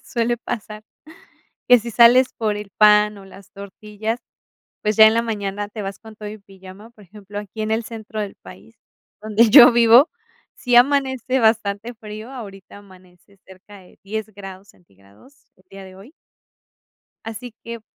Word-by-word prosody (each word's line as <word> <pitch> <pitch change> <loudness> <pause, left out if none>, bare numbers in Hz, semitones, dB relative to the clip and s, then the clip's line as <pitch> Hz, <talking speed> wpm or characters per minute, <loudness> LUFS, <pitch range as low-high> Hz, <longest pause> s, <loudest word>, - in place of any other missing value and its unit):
suele 240 0 -2
pasar, 215 -2 -7 0.9
que 245 -1 +7
si 235 +1 -8
sales 245 +3 +5
por 215 -2 -2
el 210 -1 -9
pan, 210 -1 +4
o 195 - -14
las 195 0 -16
tortillas, 210 +3 -7 0.6
pues, 210 0 -1
ya 220 0 +8
en 220 - +3
la 230 - +1
mañana 205 -2 -5
te 210 0 -8
vas 195 0 -7
con 220 -1 -14
todo 210 -1 -8
y 215 - -10
pijama. 195 +2 -15
Por 215 -3 -19
ejemplo 205 +2 -11
aquí 210 +2 -9
en 215 - -4
el 225 +1 -1
centro 220 -1 -8
del 205 -2 -6
país, 95 +4 -16 0.5
donde 215 +2 +2
yo 250 0 +9
vivo, 235 +5 +5 0.4
sí 245 -2 0
amanece 265 -1 +2
bastante 220 0 0
frío, 215 +1 -10
ahorita 200 -6 -11
amanece 185 -1 -21
cerca 190 +2 -16
de 180 - -21
10 220 +2 -5
grados 195 0 -11
centígrados, 100 - -24 0.2
el 185 - -28
día 195 0 -12
de 185 0 -14
hoy 210 +10 -16 1.1
así 225 +1 -9
que, 235 0 -8
210 Hz, 165 wpm, -20 LUFS, 195-230 Hz, 1.1 s, yo